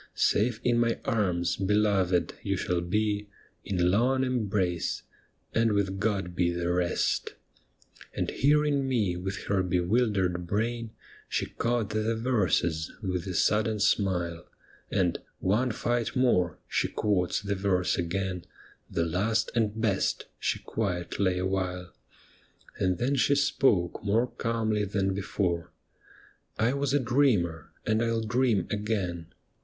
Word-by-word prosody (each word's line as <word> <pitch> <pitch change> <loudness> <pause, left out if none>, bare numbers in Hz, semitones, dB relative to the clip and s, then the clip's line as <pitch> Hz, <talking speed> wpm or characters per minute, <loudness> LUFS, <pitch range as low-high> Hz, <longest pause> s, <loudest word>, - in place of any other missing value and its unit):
'" - - -40
Safe 110 +1 +2
in 120 -1 +3
my 115 -1 +1
arms, 90 -6 +1
beloved, 95 -4 +2
you 100 -1 -1
shall 90 -1 0
be 105 +3 -1 0.3
In 90 -2 +1
long 130 +6 +2
embrace, 100 -9 -1 0.3
" - - -42
and 115 -1 +3
with 95 -1 0
God 100 -4 -1
he 90 -1 +2
the 85 0 -1
rest" 90 -1 0 0.4
' - - -22
And - - -1
hearing 145 -1 +2
me 110 -9 +1
with 95 +2 -4
her 100 -2 +1
bewildered 90 -1 +1
brain. 115 +4 -1 0.4
She - - 0
caught 115 -3 -1
the 110 +1 0
verses 90 -9 +1
with 90 -2 -2
a 90 - -3
sudden 110 +2 +2
smile, 90 -5 0 0.4
And 90 -4 +1 0.2
' - - -47 0.2
One 130 +2 +1
fight 120 +2 -1
more,' 90 -10 +2
she - - 0
quotes 95 -4 0
the 100 -1 -2
verse 95 -2 +1
again, 90 +1 -2 0.2
' - - -30
The 85 - 0
last 105 +7 0
and 110 -1 0
hest,' 100 -3 0
she - - 0
quiet 90 -6 -3
lay 95 -2 +2
a 90 - -1
while, 90 -2 -2 0.9
And 90 -1 +1
then 125 +8 0
she 140 +2 +3
spoke 130 -12 +2
more 110 +4 +2
calmly 115 -3 -1
than 95 -1 0
before: 90 -3 -2 0.4
' - - -24 0.3
I 115 +4 +2
was 140 -1 0
a - - +4
dreamer, 115 - +1
and 110 +1 +2
I 115 - +1
'11 115 -1 -1
dream 115 -4 +2
again. 100 -6 -2
100 Hz, 150 wpm, -28 LUFS, 90-115 Hz, 0.9 s, a